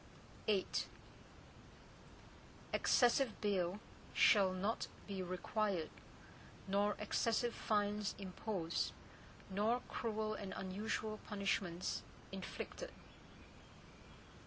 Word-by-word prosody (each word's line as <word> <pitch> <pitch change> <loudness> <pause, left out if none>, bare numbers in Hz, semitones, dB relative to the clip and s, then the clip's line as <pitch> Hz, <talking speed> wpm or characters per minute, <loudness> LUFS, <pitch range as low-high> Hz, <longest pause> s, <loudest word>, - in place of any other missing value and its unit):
VIII 205 -3 +4 2.1
Excessive 245 0 +4
bail 195 -2 +1 0.4
shall 195 -3 +7
not 195 +5 0 0.2
be 195 -2 -3
required 185 -1 0 0.8
nor 205 +1 +3
excessive 230 +3 +1
fines 210 -1 +1
imposed, 185 -3 -1 0.6
nor 220 +6 +2
cruel 215 -2 -1
and 200 -3 -4
unusual 215 +3 -2
punishments 195 -4 0 0.3
inflicted. 195 - -5
205 Hz, 70 wpm, -39 LUFS, 190-215 Hz, 2.1 s, shall